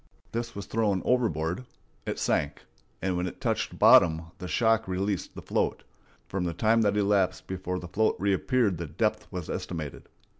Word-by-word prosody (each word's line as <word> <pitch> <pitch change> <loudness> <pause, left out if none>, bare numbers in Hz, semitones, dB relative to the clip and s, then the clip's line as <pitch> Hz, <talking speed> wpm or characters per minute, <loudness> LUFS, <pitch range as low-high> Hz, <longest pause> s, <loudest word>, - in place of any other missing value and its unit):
This 115 0 -4
was 100 -1 -5
thrown 105 -4 0
overboard. 95 -6 +1 0.4
It - - -2
sank, 75 0 0 0.4
and 95 -1 0
when 90 +1 -1
it - - -8
touched - - -1
bottom 80 0 +6
the 90 - -5
shock 115 +1 +2
released 95 +1 -2
the - - -8
float. - - -1 0.4
From 95 -2 -2
the 85 -2 -2
time 115 +4 +3
that 105 -1 +2
elapsed 100 -2 +2
before 90 -1 -3
the 90 - -6
float 110 +5 +1
reappeared 100 +1 +1
the 85 - -4
depth - - -1
was 90 -3 -5
estimated. 80 -5 -5
95 Hz, 165 wpm, -28 LUFS, 90-110 Hz, 0.4 s, bottom